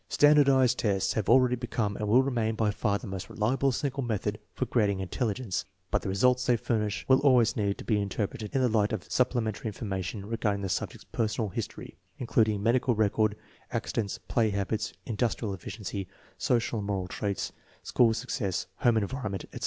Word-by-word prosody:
^Standardized 140 -4 +5
tests 100 -3 +1
have 110 -4 -1
already 125 0 +5
become 115 -4 -2
and 105 - -3
will 125 +5 +5
remain 115 -5 0
by 110 -1 +1
far 100 -1 0
the - - -10
most 95 -2 -6
reliable 130 +5 +1
single 135 +1 -2
method 105 -3 -2
for 130 - -2
grad 115 -4 +2
ing 100 -1 -1
intelligence, 105 0 -2 0.3
but - - +2
the - - -4
results 125 +6 +3
they 120 -2 +4
furnish 110 -3 -1
will 130 0 +6
always 130 -5 +4
need 100 -2 0
to - - -8
be 105 -3 +1
interpreted 105 +2 -3
in 135 - +3
the 125 - +4
light 110 -2 +2
of 100 -5 -2
supplementary 120 -4 0
information 100 -2 -4
regarding 105 -2 -1
the 95 - -2
subject's - - -3
personal 110 -1 -1
history - - -6 0.2
Including 110 -4 +1
medical 120 +1 +2
record, 110 0 +2 0.4
accidents, 105 -4 -2
play 115 -2 +2
habits, 100 +2 -2
industrial 110 -2 -1
efficiency, 95 +1 -6 0.3
social 120 -2 0
and 100 - -4
moral 95 -3 -1
traits, 100 +1 -3 0.3
school 115 -2 +3
success, 110 -6 -2
home 120 -2 +3
environment, 105 -2 -2
e0. - - -7
110 Hz, 175 wpm, -29 LUFS, 100-125 Hz, 0.4 s, will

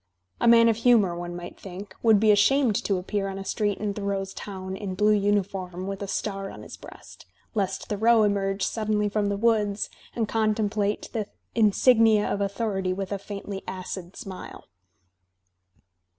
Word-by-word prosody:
A - - +2
man 230 0 +7
of 225 -2 +3
humour, 225 -7 +4
one 175 0 -5
might 175 0 -8
think, 195 +1 -9
would 220 -3 +5
be 215 0 +5
ashamed 225 +3 +4
to 195 - +1
appear 195 +2 -2
on 195 0 -5
a 195 - -6
street 205 -2 -1
in 210 -1 -2
Thoreau's 195 -1 -3
town 190 -2 -6
in 195 -2 -5
blue 210 +2 +3
uniform 195 -3 -1
with 195 0 -5
a 200 - -3
star 195 0 -3
on - - -10
his - - -9
breajst, - - -13 0.3
lest 200 -4 -1
Thoreau 220 +2 +4
emerge 195 -1 0
suddenly 210 -2 0
from 205 0 0
the 200 - -1
woods 210 -2 +1 0.2
and 225 -2 0
contem 215 -2 +1
plate 210 -1 -1
the 215 -4 -2 0.3
insignia 220 0 +4
of 200 - -1
authority 200 -2 -1
with 195 +1 -5
a 200 - -2
faintly 200 0 -6
add 185 -1 -6 0.3
smile. 195 -6 -9
205 Hz, 170 wpm, -26 LUFS, 195-215 Hz, 0.3 s, man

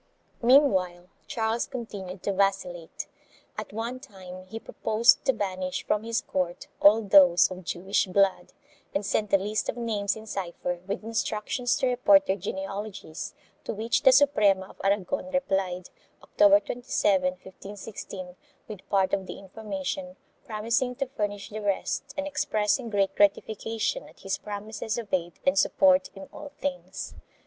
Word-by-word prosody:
4 235 - -3
Meanwhile 185 -10 +4 0.2
Charles 225 0 -1
continued 195 -7 -7
to 200 - 0
vacillate. 185 -4 -1 0.5
At - - -6
one 230 +4 -4
time 185 -7 -11
he 220 +3 -6
proposed 225 +1 +3
to - - +5
banish 185 -5 -3
from 210 - +1
his 230 +1 -1
court 180 -2 -2 0.2
all 215 +3 +7
those 190 -3 +6
of 185 0 -7
Jewish 190 +3 0
blood, 190 -1 +2 0.4
and 195 +1 0
sent 210 +1 0
a 195 - +6
list 210 +3 -2
of - - -3
names 210 -4 -1
in 220 0 -10
cypher 180 -3 -4
with 200 +2 -3
instructions 225 +2 -1
to - - 0
report 290 +4 +5
their 190 - +1
genealogies, 195 -3 -6 0.3
to - - -4
which 225 +3 0
the 265 - +7
Suprema 210 -9 +4
of - - -13
Aragon 205 +8 0
replied, 190 -9 -1 0.3
October 305 0 +5
27, 240 -8 +1
1516, 190 -1 -9 0.3
with 210 -4 -10
part 195 -2 +2
of 190 -1 0
the - - -7
information, 270 +8 -5 0.3
promising 235 +4 0
to 275 - -1
furnish 205 0 -3
the 215 +1 -5
rest 205 +7 -1
and 285 - -1
expressing 230 -3 0
great 200 -2 +1
gratification 220 - 0
at - - -20
his 195 0 -2
promises 210 +1 -4
of 230 -4 -6
aid 175 -2 0
and 185 +1 +4
support 280 -1 +4
in 195 - -9
all 295 -1 -9
things. 280 -1 -4
205 Hz, 150 wpm, -27 LUFS, 190-235 Hz, 0.5 s, all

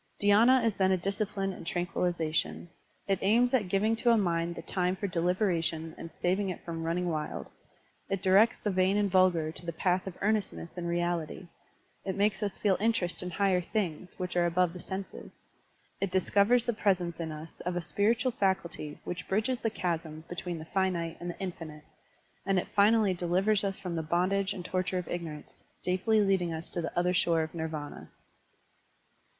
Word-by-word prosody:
DhySna 230 +5 +5
is 225 - +2
then 190 -1 +2
a 190 - +3
discipline 195 +1 -2
in - - -9
tranquillization. 175 -1 -1 0.4
It 195 -2 +1
aims 235 +5 +3
at 225 -7 +2
giving 205 +4 +2
to 240 +1 +2
a 230 - +6
mind 170 -3 0
the 165 - -7
time 180 +1 0
for 195 - -4
deliberation 170 -3 0
and 165 - -8
saving 190 +2 +1
it 180 - -6
from 165 -1 -4
running 170 +2 -1
wild; 155 -3 -3 0.6
it 195 -1 -2
directs 200 +4 +5
the 210 - -2
vain 185 +2 +2
and 205 -2 +1
vulgar 180 -4 +3
to 165 - -6
the 170 - -3
path 180 +3 0
of 185 - -6
earnestness 205 -5 -1
and 175 -1 -4
reality; 175 0 -2 0.5
it 190 - -3
makes 200 0 +1
us 205 -2 -2
feel 195 -3 +2
interest 215 -5 0
in 180 - -4
higher 185 0 +2
things 180 -3 -3
which 180 0 -4
are 175 -1 +3
above 175 0 +2
the 180 - -8
senses; 190 +2 -7 0.5
it 195 - 0
discovers 205 +6 +3
the 240 - +1
presence 180 -5 0
in 160 -1 -3
us 155 +1 -9
of 180 0 -3
a - - +1
spiritual 230 +8 +2
faculty 190 -8 -1
which 175 - -5
bridges 220 +6 0
the 225 - +1
chasm 165 -5 -3
between 175 0 -4
the 160 - -8
finite 175 -2 -1
and 175 - -5
the 175 - -7
infinite; 165 -5 -6 0.6
and 195 -1 +1
it 180 - -1
finally 210 -1 +5
delivers 185 +4 +1
us 195 -1 -1
from 180 -3 -4
the 165 - -1
bondage 185 +5 +1
and 180 -3 -6
torture 185 0 -1
of 180 -2 -3
ignorance, 165 -4 -6 0.2
safely 190 +4 +2
leading 190 -4 +2
us 160 +1 -5
to 175 - -2
the 165 - -3
other 180 +1 +2
shore 165 -2 +3
of 155 - -6
Nirvana. 160 -3 -5
180 Hz, 185 wpm, -30 LUFS, 170-200 Hz, 0.6 s, a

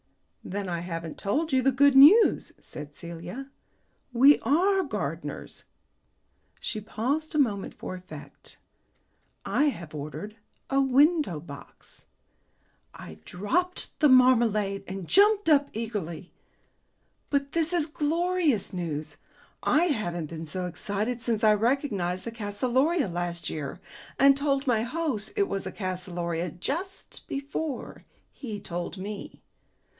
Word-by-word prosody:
"Then 200 +1 -4
I 170 -1 -2
haven't 165 -2 -6
told 295 +9 -1
you 260 - +4
the 270 +2 +3
good 280 +1 +4
news," 320 +12 +7
said 145 0 -10
Celia. 175 +11 -8 0.6
"We 270 +4 +6
are 370 - +2
gardeners." 285 - -5 0.9
She 215 - -4
paused 280 +10 -2
a - - +2
moment 215 -9 0
for - - -6
effect. 185 +1 -12 0.9
"I 295 - +2
have 170 - -3
ordered 155 +9 -7 0.3
a 275 0 +3
window 275 - +3
box." 145 -3 -13 0.9
I 80 0 -11
dropped 315 - -2
the 300 - +5
marmalade 230 -6 +4
and 190 -2 -6
jumped 410 0 +4
up 290 -3 +4
eagerly. 195 -7 -5 1.0
"But 280 -1 0
this 330 0 +1
is 345 -4 +2
glorious 315 - 0
news! 160 -4 -4 0.4
I 315 +4 +3
haven't 175 - -2
been 165 -1 -6
so 180 +3 -4
excited 205 +7 -3
since 230 -2 -1
I 215 -1 +6
recognized 210 -6 0
a - - -3
calceolaria 245 - 0
last 175 -1 -3
year, 150 +2 -5 0.4
and 275 0 +6
told 280 0 0
my 240 -5 +2
host 250 -4 -2
it 400 -2 +2
was 195 - -3
a - - -4
calceolaria 180 -3 -3
just 335 - -5
before 280 0 -5 0.3
he 220 -7 -6
told 175 0 -5
me. 200 +2 -7
225 Hz, 125 wpm, -27 LUFS, 180-285 Hz, 1.0 s, news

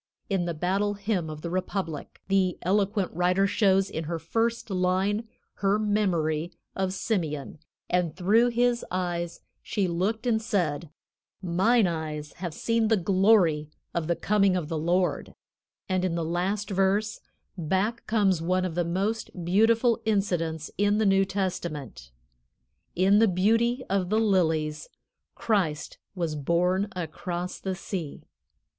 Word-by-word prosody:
In 190 -3 +1
the 170 -1 -3
"Battle 195 +5 0
Hymn 200 -5 -2
of 155 0 -8
the 170 - -4
Republic," 185 -4 -4
the 190 -2 +2
eloquent 200 +1 +1
writer 180 +3 +2
shows 195 -1 +3
in 160 -3 -4
her 165 +2 -2
first 225 +7 -1
line 190 +4 0 0.3
her 200 +1 +2
memory 175 -7 0 0.2
of 190 -1 -1
Simeon, 165 - -2 0.3
and 175 -3 0
through 210 +7 +4
his 240 0 +1
eyes 175 -2 -3 0.2
she 200 -3 -1
looked 195 +7 -1
and 225 -2 +2
said: 170 -8 -1 0.5
"Mine 190 +6 +3
eyes 155 -3 -4
have 175 -1 -4
seen 230 -1 +1
the 220 0 +3
glory 185 -5 +3 0.2
of 170 -2 -2
the 170 - +1
coming 195 +2 +2
of 165 -4 -2
the 165 - -2
Lord," 175 +3 0 0.5
and 185 -1 0
in 180 -2 0
the 165 -1 -1
last 190 +5 -1
verse, 195 +3 +1 0.4
back 190 +7 -1
comes 200 -6 +2
one 185 +2 +1
of 180 - -3
the 175 +1 0
most 190 +1 -2
beautiful 225 +5 +3
incidents 175 -7 -1
in 205 0 +3
the 220 - +2
New 195 0 +4
Testament: 170 - -4 0.9
"In 195 +3 +4
the 225 - +5
beauty 230 +7 +2
of 190 -2 0
the 215 +2 +2
lilies, 160 -7 +1 0.5
Christ 180 -9 -1 0.2
was 170 -4 -2
born 180 +6 +1
across 175 +1 -4
the 190 -1 -3
sea." 175 -5 -6
185 Hz, 140 wpm, -27 LUFS, 170-205 Hz, 0.9 s, the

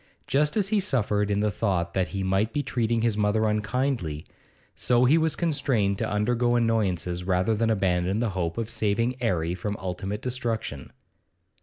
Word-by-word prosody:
Just 150 +7 +1
as 200 -2 +2
he 215 -1 +2
suffered 105 - 0
in 100 0 +1
the 105 0 +1
thought 90 -6 -1
that 95 -1 +1
he 100 -1 -4
might 95 +4 +1
be 145 -1 0
treating 115 -3 0
his 115 -3 +2
mother 105 +1 +1
unkindly, 105 - -1 0.5
so 125 0 +3
he 140 +5 +5
was 160 -1 +2
constrained 125 - 0
to 110 - -1
undergo 120 +3 +1
annoyances 95 -7 0
rather 95 +3 +1
than 115 +1 +1
abandon 95 -2 +1
the 115 -1 0
hope 90 -1 -2
of 115 -2 -2
saving 115 +3 0
'Arry 85 -7 0
from 100 +3 -4
ultimate 95 +2 -4
destruction. 115 - -3
105 Hz, 170 wpm, -26 LUFS, 95-120 Hz, 0.5 s, he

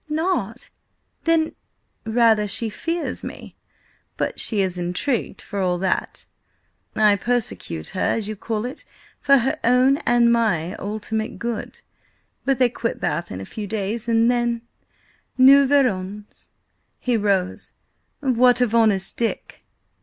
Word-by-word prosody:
"Not! 310 - -2 0.5
Then—" 330 -1 +2 0.5
"Rather, 220 -2 +3
she 220 +2 -1
fears 335 +8 -3
me. - - -9 0.6
But - - -2
she 215 -3 0
is 185 -2 -1
intrigued, 180 +9 -1
for 205 - -5
all 180 -2 +1
that. 190 +1 -2 0.7
I 210 -1 +5
persecute 210 - -2
her, 185 - -4
as 220 -3 0
you 215 - -4
call 215 +2 -3
it, 255 - -7 0.4
for 275 0 +5
her 260 +1 0
own 255 +3 +4
(and 240 -3 +3
my) 195 -7 +1
ultimate 220 +2 -4
good. 235 -2 -5 0.6
But 270 -1 +2
they 250 -2 +3
quit 230 -1 -3
Bath 170 0 -2
in 95 - -6
a - - -7
few 210 - -6
days, 215 +3 -3
and 230 +1 +4
then, 240 -1 -1 0.7
nous 270 +1 +7
verrons!" 210 -7 -1 0.5
He 250 -1 -1
rose. 200 -4 -1 0.5
"What 250 -2 +4
of 245 -3 +1
Honest 215 -5 +2
Dick?" 230 -1 -3
225 Hz, 135 wpm, -22 LUFS, 200-245 Hz, 0.7 s, nous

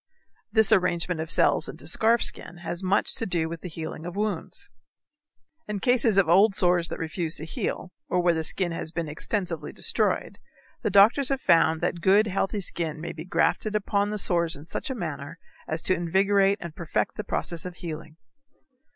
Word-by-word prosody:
This 220 0 +4
arrangement 180 -4 +2
of 160 - -6
cells - - +3
into - - -9
scarf 230 +1 +3
skin 175 - +1
has 175 +2 -4
much 190 +2 +1
to 225 - -3
do 170 -3 -1
with 165 -1 -7
the 180 - -7
healing 160 -1 -7
of 175 - -7
wounds. 210 0 -2 1.0
In 210 -1 -3
cases 235 -3 +3
of 195 -4 +4
old 195 +4 +4
sores 175 -2 +3
that - - -6
refuse 165 0 -2
to 155 - -5
heal, 170 +3 -4 0.2
or 180 - +1
where 175 -1 +3
the 160 -1 -2
skin 175 +2 +1
has 165 -1 -5
been 170 -1 -4
extensively 165 0 -2
destroyed, - - 0 0.4
the - - -1
doctors 210 +8 +5
have 270 -1 0
found 160 -7 +3
that 175 - -2
good, 200 +4 +4
healthy 200 +1 -2
skin 165 -3 -3
may 170 +2 -5
be 160 - -8
grafted 210 +3 0
upon 205 0 0
the 210 - -3
sores 170 -4 0
in 145 - -11
such 285 - -5
a 265 - -3
manner 160 - -6 0.3
as 160 +1 -3
to - - +3
invigorate 195 +3 +2
and 170 -2 -8
perfect 170 -2 -2
the - - -5
process 170 -2 -1
of 180 -1 -7
healing. 160 -2 -8
180 Hz, 190 wpm, -25 LUFS, 165-200 Hz, 1.0 s, doctors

